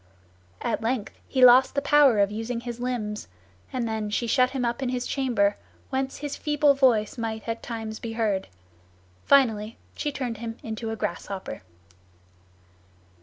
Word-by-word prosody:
At - - -1
length 225 -1 -2
he 260 -2 +5
lost 255 +2 +7
the 280 - +2
power 285 -5 +5
of 200 0 +3
using 225 +2 -3
his 240 -1 -6
limbs, 230 -4 -3 0.4
and 250 -3 -2
then 220 -1 -2
she 220 +3 -1
shut 255 +2 +3
him 260 -2 -2
up 235 +2 -2
in 260 - -1
his 250 0 -2
chamber, 225 -7 +1 0.3
whence 265 0 -2
his 290 -1 -4
feeble 295 -1 +3
voice 245 -5 +2
might 220 -1 -4
at 230 0 -3
times 225 -2 -5
be 225 -1 -5
heard. 210 -4 0 0.8
Finally 225 -5 +3 0.2
she 295 - -2
turned 250 -5 -4
him 225 +1 -6
into 225 0 -4
a 225 - -2
grasshopper. 200 - -5
235 Hz, 160 wpm, -26 LUFS, 220-260 Hz, 0.8 s, lost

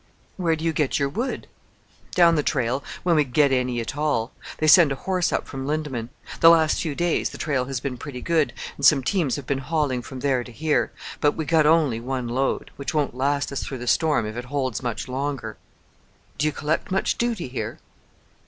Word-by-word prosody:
"Where 170 -4 +1
do 160 +1 -6
you 165 - +1
get 150 -3 +1
your 140 -1 0
wood?" 235 - -3 0.7
"Down 170 -2 +6
the 155 - +2
trail 130 -1 0 0.2
when 175 -2 +3
we 150 - +4
get 140 +1 +2
any 125 -2 0
at 115 - -5
all. 145 -6 0 0.3
They 155 - 0
send 155 -1 +7
a - - 0
horse 185 +4 -1
up - - -1
from 135 0 -6
Lindeman. 145 -6 -2 0.3
The 165 - +8
last 160 -2 +4
few 155 -3 -3
days 175 0 0
the - - -9
trail 140 -4 -1
has 135 -1 -3
been 125 0 -4
pretty 130 -1 -7
good, 160 +2 +1 0.3
and - - -9
some 135 -3 +6
teams 155 -3 +1
have 145 - -6
been 135 0 -1
hauling 140 -2 -1
from 130 +1 -9
there 130 -3 +1
to 120 - -11
here: 155 +5 0 0.3
but 145 - +3
we 160 - -4
got 155 0 +3
only 150 -8 +3
one 125 0 -3
load 130 +3 -1
which 140 +4 -4
won't 145 -5 +1
last 140 +3 0
us 140 - -3
through 135 - -5
the 125 - -7
storm, 150 +2 +2
if 110 0 -5
it 120 +1 -5
holds 130 -4 -2
much 120 -1 -3
longer." 130 -3 -3 0.8
"Do 150 - +2
you - - +1
collect 150 +2 -2
much 190 0 0
duty 235 - -1
here?" 125 0 -5
140 Hz, 215 wpm, -24 LUFS, 130-155 Hz, 0.8 s, The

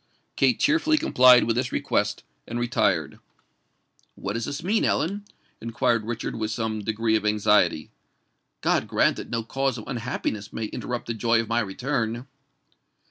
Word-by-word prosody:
Kate - - +2
cheerfully 315 0 +3
complied 125 - +6
with 115 - 0
this 130 +1 -1
request, - - -1 0.2
and 120 +1 -4
retired. 105 -10 0 1.0
"What 100 - -4
does 115 +1 -3
this 145 +3 -5
mean, 210 +5 +1
Ellen?" 200 +5 0 0.4
inquired 115 -1 0
Richard 120 -1 -4
with 110 -1 -2
some 110 0 -2
degree 110 +1 0
of 110 - 0
anxiety. 105 -6 +2 0.7
"God - - +1
grant - - +2
that - - -7
no 115 -1 -2
cause 135 +2 -1
of 110 - -7
unhappiness 115 -4 -4
may 115 - -4
interrupt 120 +3 -5
the 115 - -3
joy 115 +1 +2
of 115 - -2
my 115 +1 +2
return!" 120 +2 -2
115 Hz, 155 wpm, -25 LUFS, 110-125 Hz, 1.0 s, complied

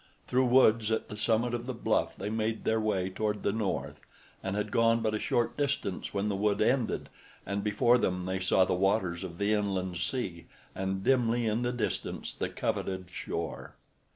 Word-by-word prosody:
Through 130 0 +2
woods 115 -3 +5
at 110 - -1
the 105 - -6
summit 115 +2 +1
of 120 +1 -3
the 130 - -3
bluff - - 0
they 105 - -4
made 110 0 -1
their 110 0 +1
way 95 -4 0
toward 105 +1 -2
the - - +2
north 105 -2 -3 0.4
and 95 +1 -3
had 105 0 -2
gone 115 0 +3
but 110 -1 0
a 110 - 0
short 120 +2 0
distance 140 -10 -2
when 100 +1 -1
the 100 - 0
wood 100 +1 +1
ended 120 +2 +1 0.4
and 100 0 -2
before 120 +4 +4
them 90 -4 0
they 95 0 -1
saw 95 0 +3
the - - 0
waters 95 -1 +1
of 85 -3 -7
the 100 +2 +1
inland 95 -4 -1
sea 85 -3 -3 0.3
and 95 0 -2
dimly 120 -2 +2
in 110 +2 +1
the 120 0 0
distance 110 -6 -3
the - - -3
coveted 95 -1 -3
shore. 85 -2 -5
105 Hz, 190 wpm, -30 LUFS, 95-115 Hz, 0.4 s, woods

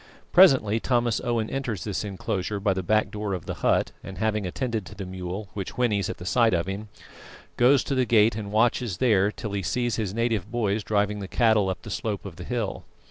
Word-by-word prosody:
Presently 130 - +6
Thomas 120 -1 +1
Owen 120 -3 0
enters 125 -8 -3
this 105 -1 -3
enclosure 100 0 -3
by 100 -1 +1
the 95 - -2
back 110 +4 +1
door 105 -2 -3
of 90 - -7
the - - -3
hut, - - +2
and 95 - -8
having 105 -3 0
attended 115 +2 -2
to 105 - -11
the 100 0 -6
mule, 95 +2 -6
which 100 +1 -6
whinnies 105 -6 +1
at - - -5
the 90 - -9
sight 115 +1 +3
of 85 0 0
him, 100 +3 -5 0.7
goes 130 +3 +4
to - - -3
the 130 -1 +2
gate 110 -2 +4
and 105 -2 -5
watches 110 -2 +1
there 105 -4 +3
till 105 -1 -6
he 100 -1 -2
sees 120 +5 -1
his 105 -5 -2
native 110 -3 -1
boys 110 -3 0
driving 105 0 0
the 100 - -5
cattle 110 -3 +3
up 95 - -4
the 105 - -8
slope 105 0 -3
of 90 -4 -8
the - - -7
hill. 120 -5 -3
105 Hz, 220 wpm, -26 LUFS, 100-115 Hz, 0.7 s, Presently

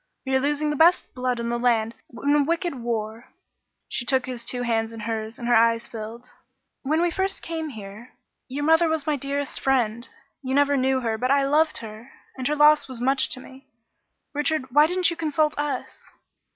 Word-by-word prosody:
We 265 - -2
are 265 - +4
losing 295 +2 0
the - - -1
best 335 +4 +4
blood 250 -1 -1
in 235 0 -2
the 240 0 -1
land 230 -2 +1 0.3
in 285 +1 +3
a 295 - +4
wicked 335 +3 -1
war." 230 -2 -4 0.6
She - - -2
took 260 +1 +1
his 250 -2 -6
two 245 +1 -2
hands 225 -2 0
in 225 -1 -8
hers, 220 0 -4
and 240 - -5
her 240 - +3
eyes 230 0 +4
filled. 230 +2 -9 0.5
"When 310 +5 +1
we 350 - +1
first 385 +2 -2
came 320 -2 -4
here, 215 0 -10 0.3
your 280 +3 -4
mother 320 +2 +4
was 315 -3 -1
my 305 - +1
dearest 280 +1 -3
friend. 235 -3 0 0.3
You 260 -1 -2
never 285 0 +3
knew 260 0 +1
her, 225 -2 -2
but 255 - 0
I 280 0 +3
loved 310 +3 +2
her 220 +4 -11 0.2
and 255 -1 -3
her 300 - +1
loss 300 0 +5
was 260 -3 -7
much 265 +2 +2
to - - -4
me. 265 +1 -14 0.7
Richard, 295 -3 -1
why 295 +4 +6
didn't 360 0 +2
you - - -4
consult 310 -2 0
us?" 290 -3 -4
265 Hz, 205 wpm, -24 LUFS, 235-295 Hz, 0.7 s, why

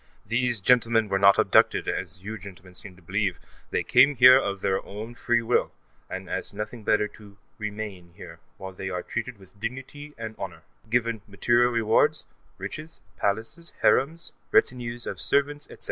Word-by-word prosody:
These 120 0 0
gentlemen 115 -1 +3
were 95 - +1
not 100 0 +6
abducted, - - +3
as 95 +1 -3
you 110 +1 -6
gentlemen 90 -1 -12
seem 90 +2 -8
to 90 - -20
believe; 95 +1 -1 0.3
they - - 0
came 140 +4 +5
here 125 +1 +9
of 100 -7 0
their 95 0 0
own 110 +4 -8
free 120 -1 +1
will, 115 - +1 0.4
and 95 0 -6
ask - - -4
nothing 105 +2 -6
better 105 0 +3
than - - -18
to 100 -2 -15 0.2
remain 105 -5 -6
here, - - -11 0.2
where 95 0 -8
they 95 +1 -5
are 90 -1 -3
treated 125 -3 -4
with 95 +1 -19
dignity 135 +6 -6
and 110 -1 -6
honor, 85 -4 -7 0.3
given 115 -1 0
material 120 +4 +2
rewards 115 -2 +2 0.3
riches, 155 +2 -7 0.2
palaces, 115 +12 -2
harems, 165 +5 +2 0.2
retinues 120 -1 +1
of 90 - -5
servants, 145 +6 +1
etc. - - -13
110 Hz, 170 wpm, -26 LUFS, 95-120 Hz, 0.4 s, here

